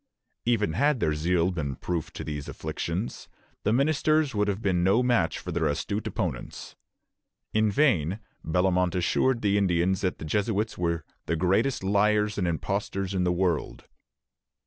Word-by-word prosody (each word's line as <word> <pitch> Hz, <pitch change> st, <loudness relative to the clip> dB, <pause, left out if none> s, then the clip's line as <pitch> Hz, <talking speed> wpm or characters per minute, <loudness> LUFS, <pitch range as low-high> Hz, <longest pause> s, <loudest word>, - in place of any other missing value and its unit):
" -, -, -49 dB
Even 110 Hz, -8 st, +1 dB
had 140 Hz, -, +2 dB
their 75 Hz, -, +1 dB
zeal 85 Hz, +3 st, +1 dB
been 75 Hz, -6 st, -3 dB
proof 85 Hz, +3 st, -3 dB
to -, -, -6 dB
these 75 Hz, -2 st, -5 dB
afflictions, 85 Hz, +6 st, -4 dB, 0.3 s
the 105 Hz, -, +1 dB
ministers 155 Hz, +2 st, +2 dB
would 105 Hz, -1 st, +1 dB
have 100 Hz, -1 st, -1 dB
been 95 Hz, -5 st, +1 dB
no 100 Hz, +7 st, +4 dB
match 120 Hz, -9 st, +2 dB
for 90 Hz, -, -6 dB
their 80 Hz, -1 st, +1 dB
astute 100 Hz, +8 st, -2 dB
opponents. -, -, -4 dB, 0.8 s
In 110 Hz, 0 st, +3 dB
vain 100 Hz, -, +2 dB, 0.2 s
Bellomont 90 Hz, +1 st, +1 dB
assured 115 Hz, +7 st, +1 dB
the 100 Hz, 0 st, +3 dB
Indians 90 Hz, -1 st, +1 dB
that 90 Hz, -2 st, -1 dB
the -, -, -7 dB
Jesuits 105 Hz, +6 st, 0 dB
were 85 Hz, -2 st, -1 dB, 0.2 s
"the 85 Hz, -, +1 dB
greatest 95 Hz, +9 st, +1 dB
lyars 105 Hz, +1 st, +2 dB
and 90 Hz, -, 0 dB
impostors 95 Hz, +3 st, -2 dB
in 90 Hz, -1 st, +1 dB
the 90 Hz, -, +2 dB
world." 90 Hz, -3 st, -1 dB
95 Hz, 160 wpm, -27 LUFS, 85-105 Hz, 0.8 s, no